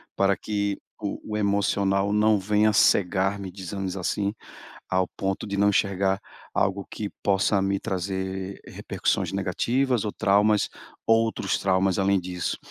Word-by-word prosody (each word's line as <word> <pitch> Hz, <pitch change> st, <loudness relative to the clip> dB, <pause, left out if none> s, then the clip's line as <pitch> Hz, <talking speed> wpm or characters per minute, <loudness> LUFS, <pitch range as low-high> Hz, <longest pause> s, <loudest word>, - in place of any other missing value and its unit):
para 100 Hz, -1 st, +2 dB
que 100 Hz, -1 st, -2 dB, 0.2 s
o 105 Hz, -2 st, -4 dB
o -, -, 0 dB
emocional 100 Hz, -1 st, +1 dB
não 105 Hz, 0 st, +4 dB
venha 105 Hz, +2 st, +3 dB
cegar-me, 95 Hz, -1 st, +2 dB
dizemos 95 Hz, 0 st, -5 dB
assim, 100 Hz, +2 st, -1 dB, 0.6 s
ao 95 Hz, 0 st, +2 dB
ponto 95 Hz, 0 st, -2 dB
de 100 Hz, 0 st, -3 dB
não 100 Hz, +1 st, +4 dB
enxergar 95 Hz, -1 st, +1 dB, 0.3 s
algo 95 Hz, 0 st, 0 dB
que 105 Hz, -2 st, -4 dB
possa 100 Hz, 0 st, +2 dB
me 100 Hz, 0 st, 0 dB
trazer 95 Hz, +1 st, -4 dB
repercussões -, -, -2 dB
negativas 115 Hz, +6 st, 0 dB
ou 105 Hz, -, -1 dB
traumas 105 Hz, 0 st, +3 dB, 0.4 s
outros 115 Hz, 0 st, +2 dB
traumas 95 Hz, 0 st, +2 dB
além 100 Hz, 0 st, +3 dB
disso. 90 Hz, -1 st, -3 dB
100 Hz, 130 wpm, -25 LUFS, 95-105 Hz, 0.6 s, não